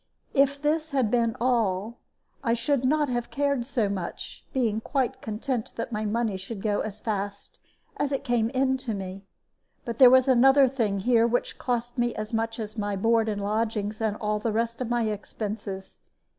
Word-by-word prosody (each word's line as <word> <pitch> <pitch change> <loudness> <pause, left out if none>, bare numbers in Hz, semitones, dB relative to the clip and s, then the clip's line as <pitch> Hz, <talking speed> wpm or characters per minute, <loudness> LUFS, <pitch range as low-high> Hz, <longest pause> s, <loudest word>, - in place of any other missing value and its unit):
If 280 0 +3
this 310 +2 0
had 265 -7 +1
been 230 -2 +2
all, 230 -3 0 0.4
I 230 -2 +2
should 255 +3 0
not 300 +2 +3
have 240 -1 -2
cared 280 -4 0
so 240 -6 +1
much, 190 -3 -5
being 225 -4 0
quite 265 0 -1
content 225 +2 -3
that 230 - -4
my 215 -1 -2
money 215 -1 0
should 195 +2 -7
go 210 -2 +1
as 215 -1 -4
fast 200 -2 -4 0.4
as 285 - -1
it 275 0 -1
came 240 -4 +1
in 265 +1 +1
to 250 -5 -4
me. 195 0 -7 0.6
But 235 -2 -5
there 255 -2 +10
was 260 +1 +5
another 270 +2 +6
thing 220 -7 -1
here 235 +1 +4
which 245 +1 -1
cost 245 0 -2
me 240 0 +1
as 215 +2 -5
much 225 +1 -1
as 215 0 -5
my 205 -1 -1
board 225 +2 +2
and 205 -1 -2
lodgings 215 0 -1
and 215 -1 0
all 210 0 -1
the 225 +1 -1
rest 230 +2 -1
of 245 - -2
my 240 -1 +1
expenses. 205 -2 -5
230 Hz, 185 wpm, -26 LUFS, 210-255 Hz, 0.6 s, there